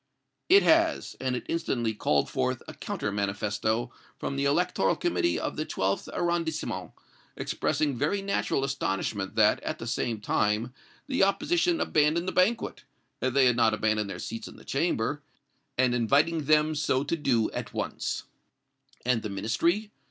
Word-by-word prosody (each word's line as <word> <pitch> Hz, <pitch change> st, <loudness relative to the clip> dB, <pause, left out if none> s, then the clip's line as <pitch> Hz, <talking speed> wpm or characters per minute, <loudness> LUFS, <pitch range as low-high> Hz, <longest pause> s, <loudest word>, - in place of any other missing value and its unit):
"It 395 Hz, +2 st, +7 dB
has; 325 Hz, 0 st, +3 dB
and 130 Hz, -1 st, 0 dB
it -, -, -5 dB
instantly 120 Hz, -9 st, -1 dB
called 75 Hz, -8 st, +1 dB
forth -, -, -1 dB
a -, -, -7 dB
counter 100 Hz, -, -4 dB
manifesto 105 Hz, +3 st, -1 dB, 0.3 s
from 140 Hz, -, -3 dB
the 140 Hz, 0 st, 0 dB
electoral 160 Hz, +6 st, +2 dB
committee 345 Hz, 0 st, 0 dB
of -, -, -3 dB
the -, -, 0 dB
Twelfth -, -, -1 dB
Arrondissement, 170 Hz, -2 st, -2 dB, 0.4 s
expressing 145 Hz, -4 st, 0 dB
very 155 Hz, +11 st, 0 dB
natural 195 Hz, -8 st, 0 dB
astonishment 100 Hz, -6 st, -2 dB
that, 110 Hz, -2 st, +4 dB
at -, -, -3 dB
the 115 Hz, -, -7 dB
same 115 Hz, -1 st, -1 dB
time 105 Hz, +3 st, 0 dB, 0.3 s
the 265 Hz, -2 st, -1 dB
opposition 335 Hz, -, +2 dB
abandoned 155 Hz, -, +2 dB
the -, -, 0 dB
banquet, 215 Hz, +6 st, +1 dB, 0.4 s
they 130 Hz, +1 st, +3 dB
had 125 Hz, -2 st, +4 dB
not 115 Hz, -2 st, +3 dB
abandoned 110 Hz, -1 st, 0 dB
their 95 Hz, -, -5 dB
seats 115 Hz, +5 st, -6 dB
in -, -, -11 dB
the -, -, -15 dB
Chamber, -, -, 0 dB, 0.6 s
and 125 Hz, -1 st, +3 dB
inviting 140 Hz, +7 st, +2 dB
them 155 Hz, +1 st, +4 dB
so 145 Hz, -3 st, +1 dB
to 150 Hz, -, -1 dB
do 125 Hz, -8 st, +1 dB
at -, -, -5 dB
once." -, -, -3 dB, 0.8 s
"And 125 Hz, -2 st, +2 dB
the 105 Hz, -, -4 dB
Ministry?" 140 Hz, -, 0 dB
135 Hz, 155 wpm, -28 LUFS, 110-170 Hz, 0.8 s, It